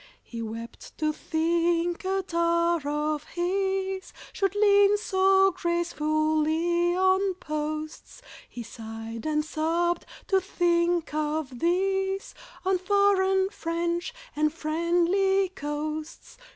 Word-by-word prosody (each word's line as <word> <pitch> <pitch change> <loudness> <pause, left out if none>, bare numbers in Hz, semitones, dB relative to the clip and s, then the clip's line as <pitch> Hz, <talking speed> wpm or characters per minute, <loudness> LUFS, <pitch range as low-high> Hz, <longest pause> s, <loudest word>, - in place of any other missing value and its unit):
He 230 -1 -7
wept 230 +1 -8
to 305 -1 0
think 335 +2 0
a 385 0 0
tar 340 -1 +1
of 300 0 -1
his 380 +1 -2 0.2
Should 395 -1 0
lean 405 0 +5
so 385 -1 +3
gracefully 340 0 +1
on 375 0 +2
posts, 310 +7 -5 0.3
He 240 - -7
sighed 225 +1 -7
and 305 0 0
sobbed 335 +2 0 0.2
to 385 -1 +2
think 345 -3 +1
of 300 -4 -2
this, 385 +3 0 0.3
On 380 -1 +2
foreign, 385 0 +3
French, 340 0 -2 0.2
and 305 +1 +2
friendly 350 +5 +1
coasts. 305 -1 -5
340 Hz, 100 wpm, -27 LUFS, 310-380 Hz, 0.3 s, lean